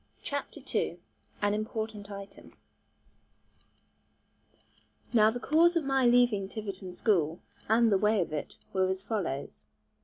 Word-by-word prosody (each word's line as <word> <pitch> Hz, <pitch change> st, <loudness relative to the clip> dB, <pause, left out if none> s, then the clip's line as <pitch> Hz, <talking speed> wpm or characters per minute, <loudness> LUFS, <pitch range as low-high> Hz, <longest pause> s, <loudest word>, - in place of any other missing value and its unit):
CHAPTER 285 Hz, 0 st, -4 dB
II -, -, 0 dB, 0.5 s
AN 205 Hz, 0 st, +3 dB
IMPORTANT 215 Hz, -1 st, -4 dB
ITEM 200 Hz, -1 st, -10 dB, 2.6 s
Now 215 Hz, -2 st, +6 dB
the 240 Hz, +2 st, -3 dB
cause 335 Hz, +6 st, +4 dB
of 335 Hz, -, +2 dB
my 270 Hz, -2 st, +2 dB
leaving 240 Hz, -5 st, +3 dB
Tiverton 195 Hz, -4 st, -6 dB
school, 180 Hz, -4 st, +1 dB, 0.3 s
and 225 Hz, 0 st, +4 dB
the 195 Hz, -, +4 dB
way 210 Hz, +1 st, +3 dB
of 170 Hz, -4 st, -1 dB
it, 150 Hz, -, -4 dB, 0.2 s
were 190 Hz, -1 st, +2 dB
as 190 Hz, 0 st, -2 dB
follows. 145 Hz, -, -3 dB
210 Hz, 125 wpm, -30 LUFS, 190-235 Hz, 2.6 s, Now